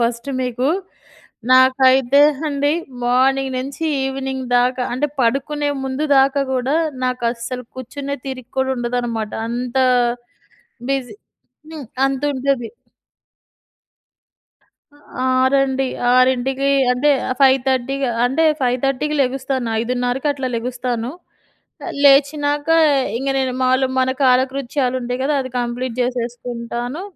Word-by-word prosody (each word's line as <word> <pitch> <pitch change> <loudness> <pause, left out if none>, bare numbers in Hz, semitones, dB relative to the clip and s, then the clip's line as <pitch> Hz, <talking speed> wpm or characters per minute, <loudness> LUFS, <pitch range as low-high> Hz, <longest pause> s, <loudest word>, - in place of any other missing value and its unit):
First 235 +2 -1
మీకు. 250 +1 -1 0.8
నాకైతే 260 +1 +5 0.3
అండి 285 0 0 0.3
మార్నింగ్ 265 +2 +2
నుంచి 275 +5 -5 0.2
ఈవినింగ్ 265 0 -3
దాకా 250 +1 +1
అంటే 275 +4 0
పడుకునే 280 +5 0 0.2
ముందు 265 +3 -2
దాకా 275 +1 +3
గూడా 260 +3 0 0.3
నాకు 255 -1 -2
అస్సలు 245 +1 -6
కూర్చునే 275 +3 -5
తీరిక 255 -2 -6
కూడా 265 0 +1
ఉండదనమాట. 240 -3 -2 0.2
అంత 240 +2 -4 1.1
బిజీ. 270 -3 -2 0.6
హ్మ్. 305 -5 -8 0.2
అంతుంటది. 270 -2 -1 2.6
ఆరండి. 265 +1 +2 0.3
6కి 260 +2 +2 0.2
అంటే 270 +4 +2 0.3
5:30కి 265 0 +2 0.2
అంటే 270 +6 +1 0.2
5:30కి 265 +4 0
లెగుస్తాను. 260 -1 -2
5:30కి 250 +3 -2
అట్లా 270 -2 -4
లెగుస్తాను. 245 0 -3 0.9
లేచినాక 290 +1 +3 0.5
ఇంగ 270 +3 -2
నేను 260 -1 -1
మాములుగా 260 +1 +2
మన 260 0 +2
కాలకృత్యాలు 260 0 +1
ఉంటాయి 245 +1 -3
గదా! 295 +2 +1
అది 260 - -6
కంప్లీట్ 240 0 -3
చేసేసుకుంటాను. 245 +2 -4
260 Hz, 95 wpm, -19 LUFS, 245-275 Hz, 2.6 s, నాకైతే